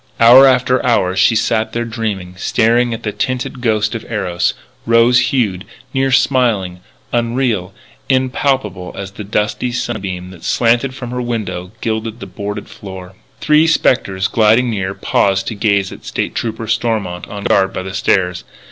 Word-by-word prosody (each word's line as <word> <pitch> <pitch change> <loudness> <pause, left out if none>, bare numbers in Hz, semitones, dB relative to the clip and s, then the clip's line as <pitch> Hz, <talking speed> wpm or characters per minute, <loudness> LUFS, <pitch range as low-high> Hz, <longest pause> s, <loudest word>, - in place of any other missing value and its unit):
Hour 125 +4 +8
after 125 0 +2
hour 95 -7 +2
she 105 +4 +4
sat 110 0 0
there 120 0 -1
dreaming, 110 -6 -4
staring 120 +5 +2
at 115 0 -5
the 105 - -2
tinted 125 +2 -3
ghost 110 -2 +1
of 115 - -5
Eros, 90 -5 -1 0.3
rose 115 +2 +5
hued, 105 -9 0 0.3
near 135 0 +1
smiling, 115 -10 +2 0.3
unreal, 115 -5 0 0.4
impalpable 130 -7 0
as 100 -1 -6
the 105 - -8
dusty 105 +4 -1
sunbeam 100 -7 -4
that 90 -3 -14
slanted 120 +3 +1
from 125 -2 -7
her 125 0 -3
window, 100 -7 -4
gilding 110 0 -2
the - - -8
boarded 105 0 -6
floor. 95 -2 -10 0.3
Three 150 +1 +4
spectres, 95 -11 +1
gliding 115 +2 +3
near, 95 -2 -3
paused 95 -1 +1
to - - -4
gaze 100 -2 +1
at - - -11
State - - -3
Trooper 115 -1 -3
Stormont, 105 -6 -2
on 100 -1 -7
guard 95 -1 +2
by 95 - -4
the 95 0 -7
stairs. 90 -2 +1
110 Hz, 155 wpm, -16 LUFS, 95-120 Hz, 0.4 s, Hour